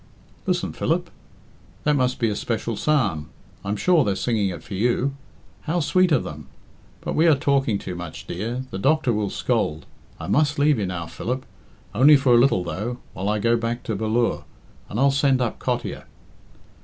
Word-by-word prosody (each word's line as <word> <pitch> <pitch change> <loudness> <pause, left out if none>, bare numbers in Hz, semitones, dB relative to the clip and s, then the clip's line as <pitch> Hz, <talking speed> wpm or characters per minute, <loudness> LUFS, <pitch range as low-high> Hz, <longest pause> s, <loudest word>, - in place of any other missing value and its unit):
"Listen, - - 0
Philip. - - -1 0.7
That 150 0 +3
must 130 -2 +1
be 115 - +1
a 105 - -2
special 115 +1 -2
psalm. 100 - 0 0.3
I'm 100 +2 -2
sure 170 - +3
they're 100 -5 0
singing 105 -2 0
it 90 - -7
for 115 - -9
you. 120 +6 +1 0.6
How 175 +2 +1
sweet 175 +4 +3
of 145 - +3
them! 75 -2 -8 0.5
But - - -3
we 165 +2 +4
are 160 - +6
talking 135 -5 +1
too 95 - -6
much, 90 -2 -7
dear. 115 +8 -4
The 95 - -4
doctor 140 +1 +2
will 105 -2 -1
scold. 75 -4 -1 0.3
I - - -6
must 150 +1 +2
leave 145 -3 +3
you 100 - -1
now, 85 -2 -4
Philip. 130 +9 -4 0.5
Only 140 +7 +7
for 135 -2 +3
a - - +7
little, 120 -8 +3
though, 110 +8 -4 0.2
while 95 +2 -2
I 105 - +1
go 115 +3 +2
back 115 +1 -3
to 110 - -2
Bal 110 +2 -2
lure, 115 +1 +1 0.5
and 105 - -3
I'll 140 +1 +5
send 135 -1 +2
up 120 -3 -2
Cottier." - - -3
120 Hz, 190 wpm, -23 LUFS, 100-140 Hz, 0.7 s, Only